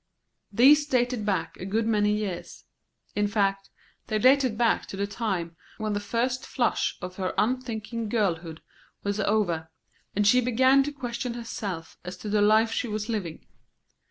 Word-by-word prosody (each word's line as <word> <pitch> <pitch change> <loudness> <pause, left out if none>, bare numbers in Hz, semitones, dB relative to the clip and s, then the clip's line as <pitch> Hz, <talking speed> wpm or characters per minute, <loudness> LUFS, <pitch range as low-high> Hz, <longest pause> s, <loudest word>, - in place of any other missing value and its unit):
These 290 +7 +6
dated 245 -5 0
back 195 -2 -1
a 185 - -7
good 220 +3 0
many 210 -2 +2
years; 210 -4 -4 0.5
in 205 0 +2
fact, 195 -2 0 0.4
they 215 - 0
dated 255 0 +4
back 235 -1 +2
to 195 - -7
the 200 - 0
time 195 -6 -3 0.2
when 215 -1 -2
the 205 - 0
first 245 +5 -1
flush 240 -4 0
of 180 0 -6
her 185 -2 -2
unthinking 230 -2 -1
girlhood 170 -7 -1 0.4
was 200 +1 -2
over, 185 -6 0 0.5
and 205 +1 +2
she 250 +5 +5
began 260 +3 +4
to 290 - -3
question 245 -3 -4
herself 200 -8 -6
as 180 0 -7
to 210 - -6
the 210 0 +2
life 220 +2 +4
she 245 - -1
was 215 0 -4
living. 190 -8 -4
215 Hz, 160 wpm, -26 LUFS, 200-240 Hz, 0.5 s, These